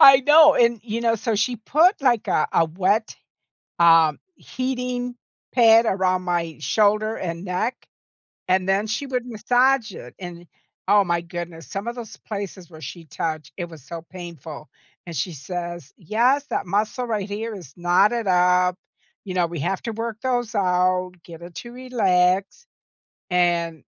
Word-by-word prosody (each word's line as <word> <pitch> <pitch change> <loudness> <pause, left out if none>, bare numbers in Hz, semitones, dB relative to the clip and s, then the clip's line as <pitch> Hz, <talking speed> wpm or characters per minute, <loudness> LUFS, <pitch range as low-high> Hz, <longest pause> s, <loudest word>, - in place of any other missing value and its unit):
I 270 -1 +9
know. 300 +2 +7
And, 235 -2 +3
you 225 0 -4
know, 230 -1 +2
so 225 +1 -2
she 235 +4 0
put, 315 - +3
like, 245 -5 +2
a - - +2
a 165 - +4
wet, 195 +7 0 0.7
um, 165 -2 +5 0.2
heating 250 -2 -4 0.4
pad 230 -1 +6
around 185 -1 +1
my 170 -3 -2
shoulder 210 +9 +2
and 170 0 -5
neck, 190 +7 -1 0.7
and 185 0 +2
then 200 +3 +1
she 215 +7 -2
would 250 -2 -3
massage 245 +1 +2
it, 125 - -11
and, 175 -2 -9 0.4
oh 205 0 +5
my 170 -2 0
goodness, 170 -1 -7
some 200 +4 -5
of 235 - -3
those 235 -3 -9
places 200 -4 -6
where 160 -2 -13
she 160 +4 -8
touched, 155 -2 -4
it 175 -2 -5
was 160 -5 -13
so 165 +3 -8
painful, 165 -5 -9 0.4
and 170 - -7
she 165 +5 -2
says, 175 0 -6
"Yes. 240 - +1
That - - -2
muscle 210 +6 -1
right 210 -4 -2
here 220 +2 -4
is 155 -8 -11
knotted 195 +6 +2
up," 180 0 +3 0.5
you 190 - -5
know, 175 -2 +2
"we 170 -1 -6
have 190 +7 -2
to 230 - -3
work 225 0 -4
those 245 -3 -1
out, 180 -1 +1
get 170 -1 -12
it 170 0 -11
to 240 - -8
relax." 195 - +1 0.6
And 170 -3 +1
190 Hz, 165 wpm, -23 LUFS, 175-230 Hz, 0.7 s, I